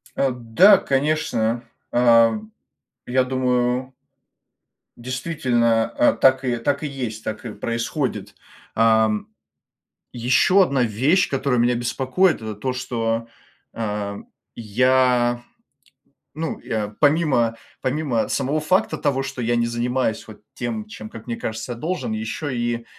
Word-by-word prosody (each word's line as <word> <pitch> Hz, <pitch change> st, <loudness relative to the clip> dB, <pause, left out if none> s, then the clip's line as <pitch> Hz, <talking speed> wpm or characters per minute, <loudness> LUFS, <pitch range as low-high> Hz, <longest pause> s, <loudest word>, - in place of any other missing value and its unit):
Эм. 125 Hz, -4 st, -2 dB
Да, 200 Hz, +1 st, +8 dB
конечно. 135 Hz, -6 st, 0 dB, 0.3 s
А, 115 Hz, -2 st, +4 dB, 0.7 s
я 130 Hz, +1 st, +2 dB
думаю 125 Hz, 0 st, 0 dB, 1.0 s
действительно, 120 Hz, -3 st, 0 dB
а, -, -, +3 dB
так 130 Hz, 0 st, +3 dB
и, 120 Hz, -1 st, 0 dB
так 140 Hz, +5 st, -1 dB
и 150 Hz, -, -1 dB
есть, 125 Hz, -6 st, -5 dB
так 110 Hz, +2 st, -5 dB
и 110 Hz, -, -5 dB
происходит. 120 Hz, +4 st, -3 dB, 0.4 s
Ам, 110 Hz, -1 st, +3 dB, 0.9 s
ещё 130 Hz, +11 st, +4 dB
одна 140 Hz, -7 st, +1 dB
вещь, 130 Hz, -, +2 dB
которая 135 Hz, -3 st, 0 dB
меня 120 Hz, +1 st, +3 dB
беспокоит, 130 Hz, +9 st, +1 dB
это 110 Hz, -1 st, -6 dB
то, 130 Hz, +4 st, -2 dB
что, 115 Hz, -2 st, -2 dB, 0.4 s
а, 105 Hz, -2 st, -3 dB, 0.4 s
я, 120 Hz, +1 st, +2 dB, 0.9 s
ну, 160 Hz, +2 st, -4 dB
я 105 Hz, -2 st, -3 dB
помимо, 145 Hz, -7 st, +2 dB, 0.2 s
помимо 130 Hz, -4 st, -1 dB
самого 140 Hz, +3 st, -1 dB
факта 155 Hz, 0 st, +1 dB
того, 140 Hz, -2 st, 0 dB
что 135 Hz, -1 st, -6 dB
я 120 Hz, +1 st, +1 dB
не 115 Hz, 0 st, +1 dB
занимаюсь 120 Hz, -1 st, -1 dB
вот 110 Hz, -1 st, -12 dB
тем, 115 Hz, -3 st, -4 dB
чем, 110 Hz, 0 st, -9 dB
как 115 Hz, 0 st, -11 dB
мне 115 Hz, -, -2 dB
кажется, 110 Hz, +2 st, -5 dB
я -, -, -10 dB
должен, 180 Hz, -, -3 dB
ещё 220 Hz, -9 st, -4 dB
и, 120 Hz, -1 st, -2 dB
125 Hz, 130 wpm, -22 LUFS, 115-135 Hz, 1.0 s, Да